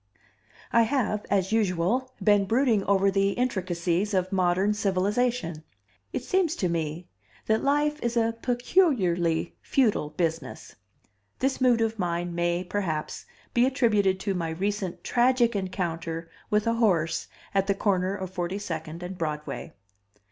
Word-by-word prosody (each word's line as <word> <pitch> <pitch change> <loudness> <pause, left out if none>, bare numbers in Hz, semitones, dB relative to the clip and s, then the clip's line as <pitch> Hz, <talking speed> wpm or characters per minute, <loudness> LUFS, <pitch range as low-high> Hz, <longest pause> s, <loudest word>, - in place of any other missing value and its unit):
] - - -27
I 235 - +6
have, 225 -4 0
as 190 -1 +1
usual, 220 +4 +1
been 205 -2 +4
brooding 230 -1 +2
over 195 0 +3
the 195 0 +2
intricacies 185 -4 -1
of 185 +1 0
modern 190 +2 +2
civilization. 200 -3 0 0.5
It - - -3
seems 365 -4 +1
to 185 - 0
me 165 +1 -3 0.4
that 220 0 +1
life 295 +2 +1
is 235 0 -1
a 230 0 +2
peculiarly 220 - +1
futile 220 - +1
business. 165 -3 -3 0.6
This 265 0 -1
mood 245 -3 +4
of 225 -1 -1
mine 175 -1 -1
may, 175 +1 0
perhaps, 175 -5 -3 0.3
be 245 +1 +4
attributed 210 -8 +2
to 195 - -1
my 170 -3 -2
recent 190 +2 -3
tragic 240 -1 +3
encounter 170 -4 -3 0.2
with 210 0 +2
a 230 - +2
horse 180 -9 +1 0.3
at 195 -1 +2
the 200 - +2
corner 190 -1 +1
of 190 -2 -6
42nd 175 -3 -4
and 180 +1 -7
Broadway. 150 -4 -4
195 Hz, 140 wpm, -27 LUFS, 175-230 Hz, 0.6 s, I